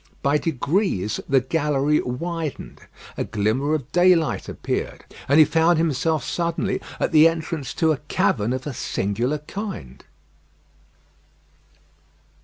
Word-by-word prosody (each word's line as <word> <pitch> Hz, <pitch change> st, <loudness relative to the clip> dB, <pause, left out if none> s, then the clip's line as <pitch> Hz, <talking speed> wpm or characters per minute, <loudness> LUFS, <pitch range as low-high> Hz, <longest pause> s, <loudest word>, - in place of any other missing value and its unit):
By 145 Hz, +2 st, +3 dB
degrees 145 Hz, -, -1 dB
the 135 Hz, -1 st, +4 dB
gallery 150 Hz, +1 st, +1 dB
widened; 160 Hz, +4 st, -5 dB, 0.4 s
a -, -, 0 dB
glimmer 115 Hz, +9 st, 0 dB
of 140 Hz, -2 st, -6 dB
daylight 175 Hz, -3 st, +3 dB
appeared, -, -, -4 dB, 0.2 s
and 140 Hz, -, +5 dB
he 155 Hz, -, +8 dB
found 165 Hz, +2 st, +3 dB
himself 160 Hz, -1 st, 0 dB
suddenly 170 Hz, -1 st, -2 dB, 0.2 s
at -, -, 0 dB
the 155 Hz, 0 st, +7 dB
entrance 160 Hz, -4 st, -3 dB
to 160 Hz, -2 st, +2 dB
a 155 Hz, -, 0 dB
cavern 120 Hz, -6 st, 0 dB
of 130 Hz, 0 st, -3 dB
a 145 Hz, -, -4 dB
singular 120 Hz, +6 st, -1 dB
kind. 150 Hz, -, -7 dB
150 Hz, 120 wpm, -23 LUFS, 130-165 Hz, 0.4 s, he